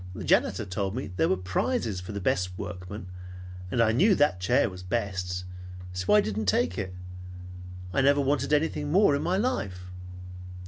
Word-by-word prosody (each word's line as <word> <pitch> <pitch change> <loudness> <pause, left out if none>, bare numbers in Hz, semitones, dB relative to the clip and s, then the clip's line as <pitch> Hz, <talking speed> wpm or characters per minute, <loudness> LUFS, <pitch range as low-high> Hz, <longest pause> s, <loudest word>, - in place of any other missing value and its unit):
The - - -6
janitor - - +2
told 95 +2 -3
me 130 -6 -4
there - - +2
were 95 - +2
prizes 95 - -1
for 90 - -8
the 100 - -4
best 90 -1 -1
workmen, 90 +3 -7 0.6
and 115 - -2
I 110 - +3
knew 190 - +4
that 145 - +2
chair 90 - +2
was 90 -1 -8
best. 90 -3 -3 0.5
So 90 +3 +2
I 105 - +7
didn't 105 0 -3
take 90 -1 +2
it. 95 -2 -4 1.0
I - - +2
never 140 +1 +4
wanted 140 +2 0
anything 150 -1 +1
more, 185 -4 +5
in 140 - -1
my 185 +2 0
life!" 95 - -2
100 Hz, 175 wpm, -27 LUFS, 90-140 Hz, 1.0 s, I